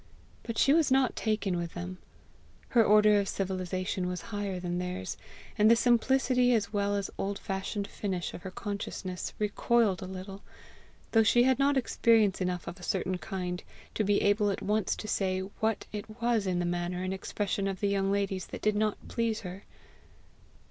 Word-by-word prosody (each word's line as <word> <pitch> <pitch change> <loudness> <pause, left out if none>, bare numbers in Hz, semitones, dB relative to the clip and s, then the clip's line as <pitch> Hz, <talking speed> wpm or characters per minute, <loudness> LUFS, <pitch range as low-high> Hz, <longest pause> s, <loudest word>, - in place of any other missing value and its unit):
But 230 -2 -5
she 275 - +5
was 320 -2 +4
not 265 -1 +3
taken 215 -4 0
with 170 -1 -4
them. 180 +1 -6 0.7
Her 235 -2 +5
order 210 0 +6
of 200 - -1
civilization 185 -1 -2
was 180 0 -3
higher 200 -3 -2
than 175 0 -2
theirs; 180 - -4 0.4
and 210 +1 +6
the 230 - +7
simplicity 250 +1 +3
as 210 -1 -1
well 205 0 +1
as 200 -1 -2
old 200 +1 -1
fashioned 200 +1 -3
finish 190 -4 -3
of - - -8
her 190 - -6
consciousness 195 -2 -5
recoiled 210 -1 +2
a 185 - -5
little 190 +1 -7 0.7
though 225 - +5
she 240 +2 +5
had 260 0 +3
not 280 0 +3
experience 225 -6 +3
enough 180 -1 -1
of 180 - -7
a - - -12
certain 185 -1 -1
kind 180 -2 -4 0.3
to 215 - 0
be 205 0 +2
able 205 0 +3
at 195 - -3
once 210 -1 +1
to 215 - -7
say 190 -2 0
what 220 +3 -2
it 215 +2 -7
was 235 -4 +1
in 180 -1 0
the 175 - 0
manner 175 +1 -2
and 185 0 -2
expression 195 +1 -2
of 195 -1 -3
the 205 - +1
young 195 -1 +1
ladies 200 -2 -1
that - - -8
did 215 0 +2
not 215 0 -1
please 230 -2 -1
her. 185 0 -8
200 Hz, 185 wpm, -30 LUFS, 185-220 Hz, 0.7 s, the